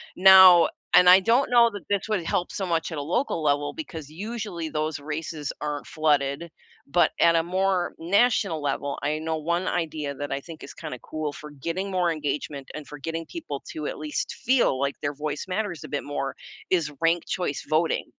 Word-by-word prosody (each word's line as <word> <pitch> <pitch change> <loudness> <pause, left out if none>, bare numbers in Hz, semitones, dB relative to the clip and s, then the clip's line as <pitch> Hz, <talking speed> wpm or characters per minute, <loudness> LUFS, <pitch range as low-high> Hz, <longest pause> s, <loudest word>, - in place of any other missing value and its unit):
now 190 -2 +8 0.3
and 180 - +8
I 185 +1 +9
don't 235 +7 +3
know 240 -1 +6
that 200 -6 -9
this 200 0 0
would 205 -5 0
help 175 +2 -1
so 195 - -3
much 165 0 -1
at 160 - -5
a - - -2
local 250 - 0
level 145 0 +1
because 160 - -7
usually 200 -2 -5
those 155 -1 -2
races 150 0 -5
aren't 150 -1 -4
flooded, 150 0 0 0.4
but 175 +5 +3
at 170 0 +5
a 165 - +4
more 185 0 0
national 195 -2 +2
level, 145 -1 -2
I 150 +2 0
know 160 0 -2
1 170 +4 -1
idea 155 -4 -2
that 145 +2 -5
I 135 - -1
think 160 +1 -11
is - - -9
kinda 150 -7 -7
cool 155 -2 -4
for 150 +1 -10
getting 170 +7 -4
more 180 -2 +1
engagement 145 -2 -4
and 150 -1 -8
for 150 -1 -10
getting 165 +3 -4
people 160 - -6
to 155 -2 -5
at - - -5
least 150 -1 -3
feel 240 - +3
like 140 +1 0
their 145 0 -2
voice 150 0 -4
matters 185 -2 -3
a - - -7
bit 145 - -3
more 135 -2 -4 0.3
is 170 -5 +1
ranked 165 0 +2
choice 175 -6 -3
voting. 160 +2 +1
165 Hz, 200 wpm, -25 LUFS, 150-185 Hz, 0.4 s, I